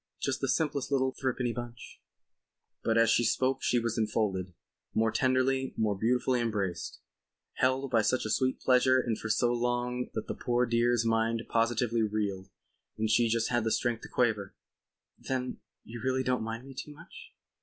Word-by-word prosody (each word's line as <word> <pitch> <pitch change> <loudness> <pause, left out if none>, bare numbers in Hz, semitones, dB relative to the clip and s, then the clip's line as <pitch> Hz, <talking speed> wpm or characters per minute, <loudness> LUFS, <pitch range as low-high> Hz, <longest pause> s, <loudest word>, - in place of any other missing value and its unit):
Just 135 -1 -2
the 135 - 0
simplest 145 0 0
little 130 -1 +2
thrippenny 125 -2 -1
bunch." 120 0 -8 0.8
But 115 0 +2
as 115 -1 +5
she 120 - +3
spoke 130 +3 +1
she 125 - +2
was 115 -1 -1
enfolded—more 105 +1 -2
tenderly, 130 +1 +1
more 105 -2 +1
beautifully 125 +4 +1
embraced, 100 -7 -2 0.6
held 130 +1 +1
by 115 - +4
such 130 +3 +1
a 110 - -2
sweet 130 +2 +1
pressure 130 0 +4
and 120 -3 -1
for 110 - -5
so 120 +2 +2
long 120 +1 -1
that 110 - -2
the - - -4
poor 120 0 0
dear's 120 0 +2
mind 115 0 +1
positively 115 0 +1
reeled 100 -3 -2 0.5
and 110 0 0
she 115 +1 +4
just 115 0 +1
had 120 -2 +1
the 110 - 0
strength 120 0 0
to - - -10
quaver: 110 -6 0 0.6
"Then 130 -1 -3 0.2
you 115 0 -9
really 130 0 +1
don't 125 -1 0
mind 115 +3 -5
me 135 - -10
too 150 +3 -7
much?" 430 - -14
120 Hz, 170 wpm, -30 LUFS, 110-130 Hz, 0.8 s, as